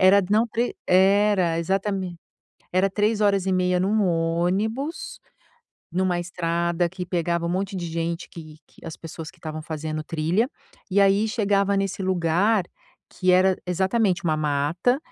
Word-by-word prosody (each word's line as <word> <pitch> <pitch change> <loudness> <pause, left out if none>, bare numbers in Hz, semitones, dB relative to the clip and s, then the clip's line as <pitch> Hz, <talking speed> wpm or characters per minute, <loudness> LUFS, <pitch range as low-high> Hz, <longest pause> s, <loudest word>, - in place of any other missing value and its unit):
era, 195 +1 +6
não, 220 +3 +4
tre 235 +2 -2
era 190 -2 +3
exatamente, 190 0 -2 0.5
era 185 +2 +3
3:30 195 -3 +1
num 210 +3 +2
ônibus, 180 - -1 0.7
numa 180 -1 +1
estrada 170 0 -1
que 180 +1 -6
pegava 170 -1 -1
um - - -1
monte 190 +2 -2
de 175 - -4
gente 165 +1 -3
que 155 -2 -11
que - - -20
as 160 - -6
pessoas 165 0 -8
que 190 - -25
estavam 155 -1 -6
fazendo 155 0 -4
trilha 170 +10 0 0.4
e, 200 +2 +3
aí, 200 +2 +4
chegava 200 -2 +1
nesse 195 0 -2
lugar, 185 +3 +2 0.5
que 185 0 0
era, 185 +1 +4
exatamente, 190 +1 +1
uma 155 -2 +1
mata 155 - +1
185 Hz, 140 wpm, -24 LUFS, 170-200 Hz, 0.7 s, era